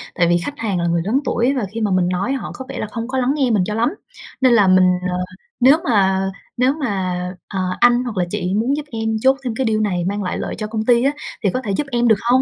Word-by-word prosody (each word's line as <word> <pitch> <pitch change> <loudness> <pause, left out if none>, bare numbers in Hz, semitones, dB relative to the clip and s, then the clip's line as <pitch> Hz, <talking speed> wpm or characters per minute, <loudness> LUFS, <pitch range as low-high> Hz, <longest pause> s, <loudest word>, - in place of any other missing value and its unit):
Tại 170 - +3
vì 175 0 +3
khách 280 +12 -5
hàng 200 -5 -1
là 170 - 0
người 170 0 +1
lớn 235 +7 +2
tuổi 245 +3 +1
và 255 -6 -1
khi 230 - -4
mà 210 -2 0
mình 185 -1 +2
nói 190 +9 -1
họ 270 - -4
có 260 - -8
vẻ - - -5
là 215 - -3
không 230 -1 -4
có 265 +1 -3
lắng 260 +2 +1
nghe 265 -4 +1
mình 205 -4 +2
cho 210 - -3
lắm, 225 +2 +1 0.5
nên 255 -2 +5
là 205 -4 +5
mình, 185 0 +5 0.2
ờ, 180 - -2 0.4
"Nếu 265 +5 +6
mà 195 - +2 0.3
nếu 255 +3 +3
mà, 290 -5 -3 0.6
à, 195 - -4 0.2
anh 245 0 +4
hoặc 235 -5 -5
là 180 - +1
chị 180 +1 -2
muốn 235 +6 +1
giúp 300 - -5
em 225 -1 -2
chốt 265 +1 +4
thêm 245 -3 -2
cái 265 - -1
deal 215 -1 +1
này 185 -5 0
mang 200 +2 -2
lại 180 - -2
lợi - - -4
cho 215 - -4
công 220 0 -3
ty 240 -1 +4
á, 275 - +3 0.3
thì 200 - +3
có 255 - -1
thể 205 - -2
giúp 275 +8 -1
em 240 0 +2
được 220 - +6 0.2
hông?" 260 +1 +5
225 Hz, 285 wpm, -19 LUFS, 190-255 Hz, 0.6 s, Nếu